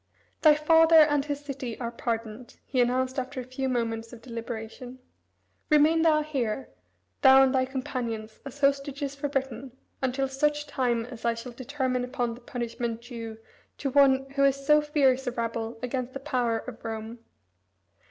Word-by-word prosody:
"Thy 305 -2 +7
father 325 +2 +5
and 295 -3 +6
his 290 -1 -3
city 260 -5 -5
are 235 -2 -3
pardoned," 230 0 -5
he 255 -2 +1
announced 255 +2 +1
after 260 +1 -5
a - - -4
few 255 +1 -3
moments 230 -2 -2
of 235 -2 -12
deliberation. 230 +1 -7 0.7
"Remain 305 +2 +5
thou 310 -2 +4
here, 270 -5 -2 0.5
thou 265 0 +8
and 265 0 +2
thy 260 -1 +2
companions, 240 -4 -4
as 280 +1 -9
hostages 280 0 0
for 285 +1 -4
Britain, 265 -2 -4 0.2
until 265 +1 0
such 295 +2 0
time 245 -5 0
as 240 -2 -10
I 235 0 +1
shall 230 +2 -7
determine 255 0 -2
upon 245 -2 -2
the 240 - -12
punishment 235 -1 -4
due 230 -3 -7 0.4
to 275 - -2
one 270 -1 +4
who 275 0 +1
is 275 0 +2
so 300 +1 +6
fierce 275 -3 +2
a - - +1
rebel 230 -1 -3
against 255 0 -3
the 275 - -5
power 250 -5 0
of 230 +1 -9
Rome." 225 +1 -6
255 Hz, 165 wpm, -27 LUFS, 235-275 Hz, 0.7 s, thou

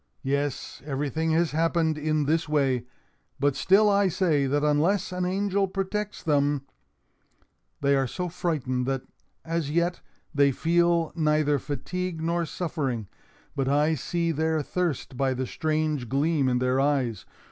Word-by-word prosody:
Yes, 140 0 -2
everything 150 +3 -2
has 165 0 +2
happened 165 0 +1
in 155 0 0
this 160 +2 0
way, 135 -5 +1 0.5
but 140 0 +2
still 205 +3 +4
I 200 -1 +4
say 160 -6 +1
that 145 +2 +1
unless 155 +7 +2
an 180 0 -1
angel 195 +1 +1
protects 195 +2 -3
them—— 145 -2 +1 1.2
"They 140 0 +3
are 135 -1 +1
so 180 +7 -3
frightened 140 -8 -2
that, 135 -1 -1 0.4
as 165 -3 -1
yet, 170 +3 0 0.3
they 140 -2 +4
feel 170 +2 +2
neither 150 -3 +2
fatigue 165 +6 -4
nor 170 +1 0
suffering. 140 - -3 0.5
But 135 -2 -1
I 150 +3 +3
see 170 +4 -1
their 160 0 0
thirst 160 -7 -2
by 135 -1 +1
the 130 +1 -2
strange 155 -3 -1
gleam 140 0 +2
in 125 - +1
their 125 +1 +1
eyes. 135 -7 0
155 Hz, 145 wpm, -26 LUFS, 140-170 Hz, 1.2 s, still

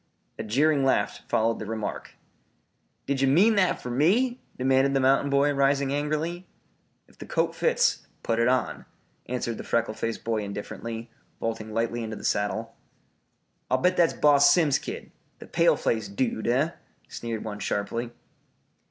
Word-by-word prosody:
A - - -2
jeering 140 +6 +2
laugh 135 - +1
followed 115 +1 +1
the 105 - -6
remark. 110 -1 -5 0.9
"Did 140 -1 -1
ye 135 - +3
mean 185 +12 +5
that 190 -4 +2
fer 125 - -6
me?" 225 - +2 0.2
demanded 135 +1 +2
the - - +3
mountain 135 +2 +3
boy, 140 +1 +3
rising 140 0 +2
angrily. 155 +5 -2 0.6
"If - - -25
the - - -9
coat - - 0
fits, - - +1 0.2
put 115 0 0
it 115 - +3
on," 130 0 0 0.4
answered 120 -2 -3
the - - -5
freckle 115 -2 0
faced 115 +1 -4
boy 115 -1 -1
indifferently, 115 +3 -6 0.3
vaulting 110 -1 -4
lightly 115 +2 -1
into 110 -1 -5
the - - -10
saddle. 110 +2 -1 0.9
"I'll 130 - +3
bet 180 +8 +2
that's 170 -2 +3
Boss 145 -1 +5
Simms's 155 -6 +3
kid - - -7 0.3
the - - -11
pale - - +3
faced 105 -3 -2
dude, 115 -3 -1
eh?" 135 +7 +2 0.4
sneered 115 -2 -5
one 105 -2 -6
sharply. 115 +4 -2
130 Hz, 160 wpm, -26 LUFS, 115-145 Hz, 0.9 s, mean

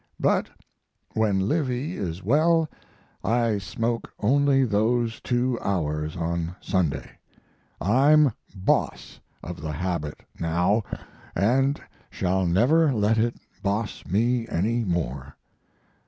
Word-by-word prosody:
But - - +2 0.6
when 100 -3 +1
Livy 145 +3 -1
is 90 -1 -4
well 160 - +3 0.6
I 115 -2 +1
smoke 115 +5 -3
only 135 +4 +3
those 115 +1 +1
two 125 0 0
hours 80 -4 -1
on 85 +1 -2
Sunday. 90 -7 -2 0.6
I'm 140 - +5 0.2
boss 95 -1 -1 0.2
of 90 -1 -7
the 75 0 -4
habit 80 -2 -3 0.2
now, 90 +6 +2 0.5
and 135 +9 +2 0.3
shall 95 0 0
never 135 - +4
let 110 -1 +2
it 120 +1 +1 0.3
boss 100 +2 -2
me 115 +5 +1
any 115 +7 0
more. 70 - -3
105 Hz, 105 wpm, -25 LUFS, 90-125 Hz, 0.6 s, I'm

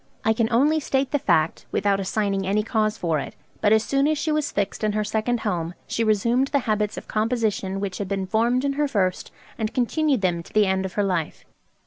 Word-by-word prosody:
I 220 - +4
can 225 +1 0
only 290 +7 +3
state 270 -2 -1
the 290 - +1
fact, 165 -7 +1
without 200 0 +1
assigning 195 0 -1
any 210 +2 +1
cause 215 0 0
for 165 -3 0
it; - - -7 0.3
but 210 - +3
as 220 0 +5
soon 275 +3 +1
as 310 0 +1
she 300 +2 -1
was 305 -1 0
fixed 200 +2 -2
in 215 -1 +1
her 215 0 0
second 220 +3 -1
home, 175 -4 -2
she 230 - -1
resumed 230 +5 +2
the 280 - +1
habits 210 -2 0
of - - -8
composition 215 -4 -1
which 195 -2 -4
had 200 - -3
been 195 -1 -2
formed 235 +7 +1
in 280 - +1
her 295 +1 0
first, 190 -8 -1 0.3
and 220 +2 -2
continued 270 0 +1
them 175 -3 0
to - - -16
the 215 -1 +4
end 190 0 0
of 185 - -5
her 205 - +1
life. 180 -5 -2
215 Hz, 230 wpm, -24 LUFS, 195-245 Hz, 0.3 s, as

